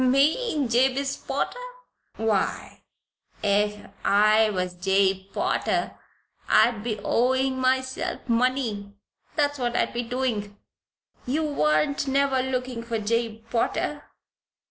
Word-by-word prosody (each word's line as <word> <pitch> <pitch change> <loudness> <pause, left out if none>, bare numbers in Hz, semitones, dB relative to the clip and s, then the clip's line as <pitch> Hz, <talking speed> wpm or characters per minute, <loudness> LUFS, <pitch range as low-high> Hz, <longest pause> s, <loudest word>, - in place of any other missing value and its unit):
"Me 290 - +2
Jabez 265 +3 +1
Potter? - - -3 0.6
Why, 220 -3 -1 0.6
ef 205 0 +1 0.2
I 215 +2 +4
was 185 -3 -2
Jabe 190 +1 +1
Potter - - -1 0.5
I'd 230 -3 +4
be 225 -2 -2
owing 260 +2 +1
myself 260 +1 -1
money, 230 -4 0 0.4
that's 290 -2 +1
what 240 -1 -1
I'd - - 0
be 240 - -1
doin'. 230 -4 -3 0.7
You 300 +5 0
warn't 215 - +1
never 270 -1 +2
lookin' 255 -2 -3
for 230 -1 -3
Jabe 225 +1 -1
Potter?" 230 - -1
240 Hz, 105 wpm, -25 LUFS, 210-260 Hz, 0.7 s, I